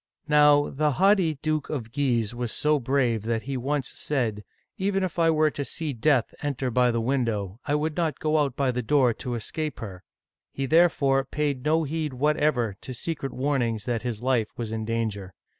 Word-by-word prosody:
Now 150 -1 +5
the 150 +1 +1
haughty 190 -2 +3
Duke 155 -1 -1
of 120 -7 -4
Guise 120 -5 0
was 120 -1 -3
so 150 0 +2
brave 125 -3 +1
that 115 +1 -2
he 135 0 -4
once 135 +1 -1
said, 115 -8 -2 0.2
" - - -45
Even 195 0 0
if 180 -1 -3
I 165 -1 +4
were 155 -1 +3
to 145 - -3
see 150 +1 -4
death 125 +1 +2
enter 135 -3 -2
by 125 +1 +3
the 115 -1 0
window, 115 -5 -1
I 145 - +2
would 150 +1 -1
not 160 -5 0
go 155 0 +1
out 140 -4 0
by 135 -2 +1
the 125 0 -2
door 125 0 +3
to 120 +2 -5
escape 150 +6 -4
her." 95 -5 -8 0.5
He 135 - -3
there 165 +5 +5
fore 135 -3 +1
paid 140 -1 -2
no 160 +2 +2
heed 155 -1 -3
whatever 135 -5 +1
to 130 - -7
secret 140 0 -4
warnings 125 -6 -1
that 120 -2 -1
his 120 -2 -4
life 125 -4 +1
was 115 -2 -4
in 110 -1 -3
danger. 110 -5 -3
135 Hz, 200 wpm, -26 LUFS, 115-150 Hz, 0.5 s, Now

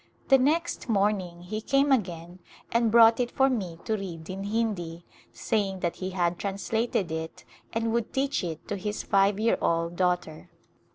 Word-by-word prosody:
The 270 -1 +7
next 310 +1 0
morning 195 -5 0
he 215 +4 -4
came 275 +4 +2
again 175 -7 -1 0.3
and 235 -1 +3
brought 230 +1 +6
it 245 -1 +1
for 270 +1 +2
me 185 -9 -3
to 220 - 0
read 175 -5 -6
in 195 +1 -5
Hindi, 200 -6 -2 0.3
saying 195 -4 -1
that 170 - -1
he 185 - -4
had 175 -2 -1
translated 200 -1 -1
it 160 0 -5 0.3
and 225 0 -1
would 235 -1 -1
teach 270 -4 0
it 160 -3 -5
to 205 - -3
his 205 +2 -4
five 200 0 +3
year 225 +1 +2
old 170 +1 0
daughter. 180 -3 -1
200 Hz, 170 wpm, -27 LUFS, 175-230 Hz, 0.3 s, The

